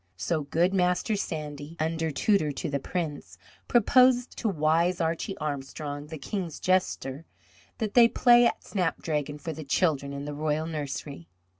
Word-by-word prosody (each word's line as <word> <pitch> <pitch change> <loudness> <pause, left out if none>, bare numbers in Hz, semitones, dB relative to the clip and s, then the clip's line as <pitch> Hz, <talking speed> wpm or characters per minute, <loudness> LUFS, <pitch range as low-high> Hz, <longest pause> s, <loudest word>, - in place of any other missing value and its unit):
So 125 - -1
good 165 +6 +1
Master 180 +3 +1
Sandy, 150 -4 -5
under 160 +1 -1
tutor 155 +3 +1
to 145 +2 -4
the 140 - 0
Prince, 145 - -4 0.3
proposed 250 +1 +4
to 225 - 0
wise 165 +1 +2
Archie 165 +4 -2
Armstrong, 145 0 -5
the 160 +1 -7
King's 170 +2 -4
jester, 165 -5 0 0.5
that 220 -3 -3
they 240 -2 +8
play 240 0 +5
at - - -3
snapdragon 155 -6 -2
for 160 +2 -5
the 155 - -7
children 140 -1 +1
in 140 0 -5
the 145 - -5
royal 155 +1 -1
nursery. 145 - -5
160 Hz, 150 wpm, -27 LUFS, 145-185 Hz, 0.5 s, they